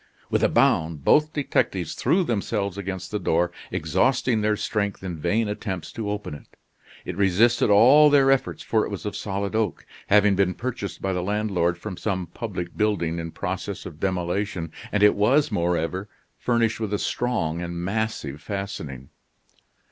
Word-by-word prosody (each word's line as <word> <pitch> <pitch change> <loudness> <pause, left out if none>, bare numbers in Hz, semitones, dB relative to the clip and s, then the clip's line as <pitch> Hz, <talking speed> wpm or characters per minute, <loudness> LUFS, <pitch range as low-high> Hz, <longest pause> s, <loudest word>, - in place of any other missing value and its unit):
With - - +2
a - - +4
bound, 80 -3 +2
both 155 +1 +4
detectives 95 - -1
threw 185 +3 +2
themselves 100 - -1
against 95 -2 -5
the 105 - -1
door, 85 -1 +1 0.2
exhausting 120 - +1
their 105 0 +2
strength 100 -3 -2
in 90 -4 -5
vain 110 +7 +1
attempts 100 -5 -4
to 110 -2 -4
open 105 -5 -4
it. 75 - -11 0.6
It - - -4
resisted 100 +6 +3
all 130 +9 +7
their 135 -2 +5
efforts, 135 -1 0
for 110 -1 +1
it - - -3
was 100 -1 -6
of 105 - -3
solid 100 0 -3
oak, 110 -4 -1 0.2
having 105 -1 +5
been 95 -1 +1
purchased 120 -5 -5
by 95 -1 0
the 90 - -1
landlord 95 -3 0
from 95 +1 -7
some 95 -4 -2
public 90 -1 -6
building 95 -6 0
in 85 0 -4
process - - -4
of 75 - -9
demolition, 90 -2 -2 0.2
and 105 -1 +2
it 105 - +7
was, 125 +9 +3
moreover, 90 +1 -1 0.3
furnished 115 -2 0
with 105 -2 -1
a - - 0
strong 95 -10 -1
and 85 0 -5
massive 95 -8 -3
fastening. 85 - -6
100 Hz, 165 wpm, -24 LUFS, 90-110 Hz, 0.6 s, all